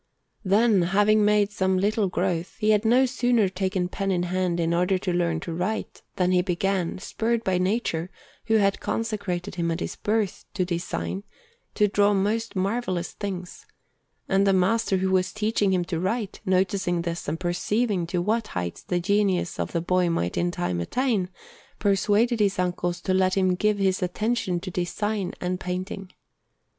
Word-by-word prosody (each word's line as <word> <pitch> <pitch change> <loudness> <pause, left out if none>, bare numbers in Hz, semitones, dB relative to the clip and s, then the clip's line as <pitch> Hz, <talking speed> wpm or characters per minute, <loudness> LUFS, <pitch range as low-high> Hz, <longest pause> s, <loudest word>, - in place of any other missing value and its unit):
Then, 205 +1 +4
having 205 +4 +3
made 210 0 +3
some 190 -3 +1
little 205 +2 +1
growth, 180 -1 -2
he 215 -1 +2
had 210 +1 +2
no 250 +4 +5
sooner 245 -4 +2
taken 185 -1 -1
pen 195 +2 -3
in 180 -2 +1
hand 180 -1 -1
in 165 0 +1
order 180 +2 +2
to 185 -1 -2
learn 170 -2 +1
to 170 - -5
write, 195 +6 -3
than 180 -1 +1
he 180 -1 +4
began, 185 0 -1
spurred 230 +4 -1
by 185 -3 +1
Nature, 185 -3 -1 0.4
who 225 - +2
had 200 -2 +3
consecrated 205 -6 -3
him 170 -2 -1
at 165 +1 -1
his - - -4
birth 210 -2 -1
to 185 -3 +1
design, 180 +2 -3 0.5
to 210 - +4
draw 205 0 +3
most 220 +4 -1
marvellous 190 -2 -1
things; 185 -3 -6 0.6
and 195 +1 +3
the 195 - +4
master 190 +2 +2
who 190 0 0
was 185 -1 +2
teaching 215 -2 +1
him 180 -2 +1
to 170 -2 -3
write, 205 +3 -2
noticing 185 -2 +1
this 170 0 -4
and 155 +3 -2
perceiving 185 +2 0
to 175 0 -1
what 220 +3 0
heights 90 -1 -4
the 180 - -1
genius 190 -1 +1
of - - -2
the 170 - -1
boy 180 +1 +2
might 90 - -1
in 175 - +1
time 90 - -2
attain, 215 - 0 0.5
persuaded 210 +3 +2
his 200 -2 +2
uncles 175 -1 -1
to 185 - 0
let 185 0 +2
him 185 -1 +3
give 210 +3 +1
his 190 -1 +1
attention 185 0 -1
to 185 +2 -6
design 190 +2 -2
and 180 0 -2
painting. 185 +1 -5
190 Hz, 175 wpm, -25 LUFS, 180-210 Hz, 0.6 s, no